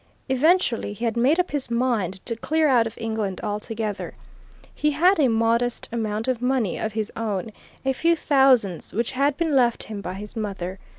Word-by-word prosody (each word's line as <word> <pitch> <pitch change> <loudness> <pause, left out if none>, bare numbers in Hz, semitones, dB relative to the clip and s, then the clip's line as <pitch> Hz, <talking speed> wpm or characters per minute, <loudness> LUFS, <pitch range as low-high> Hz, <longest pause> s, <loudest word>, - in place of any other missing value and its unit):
Eventually 265 - +2
he 225 +4 -4
had 225 - 0
made 265 +8 +3
up 360 - 0
his 290 -4 -3
mind 230 -7 -1
to 230 - -3
clear 310 +7 +1
out 240 -5 +4
of 225 - -9
England 220 -4 -3
altogether. 210 0 -4 0.6
He 300 - +1
had 340 +6 +3
a 280 - +5
modest 230 +1 +1
amount 220 -1 -2
of 255 -2 0
money 250 -6 0
of 220 - -3
his 215 -1 -2
own, 215 -1 -3 0.3
a 265 - +2
few 335 +5 +2
thousands 260 - +2
which 230 +1 0
had 280 +2 +1
been 325 -4 0
left 240 -3 +3
him 210 -2 -7
by 185 -1 -5
his 210 +3 -9
mother. 195 -4 -4
230 Hz, 185 wpm, -24 LUFS, 210-270 Hz, 0.6 s, a